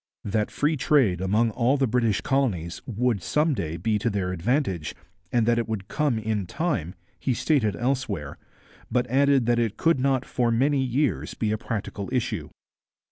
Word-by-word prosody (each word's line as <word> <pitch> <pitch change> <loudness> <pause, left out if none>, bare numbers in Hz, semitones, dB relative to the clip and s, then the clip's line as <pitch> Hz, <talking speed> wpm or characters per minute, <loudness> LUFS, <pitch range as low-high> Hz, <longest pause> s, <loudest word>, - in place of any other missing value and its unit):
That 105 +1 0
free 150 +1 0
trade 120 - +3
among 110 +5 +2
all 125 +5 +2
the 135 - +2
British 115 -3 +1
communities 100 -12 -1
would 120 -3 0
some 150 - +1
day 85 - -3
be 110 +1 0
to 115 - 0
their 100 -3 -1
advantage, 95 - -1 0.4
and 120 -2 +2
that 120 0 +3
it 115 - -2
would 100 -4 -3
come 150 -6 +1
in 105 -3 -2
time, 140 - -2 0.2
he 130 - 0
stated 115 -7 +1
elsewhere, 115 - -2 0.5
but 125 +1 +1
added 140 -1 +4
that 120 0 +2
it 115 -3 -1
could 165 -4 +2
not 135 0 +1
for 120 -2 0
many 135 +4 +2
years 125 - -1
be 110 -2 -1
a 110 - 0
practical 105 -3 -4
issue. 125 -3 -2
115 Hz, 175 wpm, -25 LUFS, 100-135 Hz, 0.5 s, added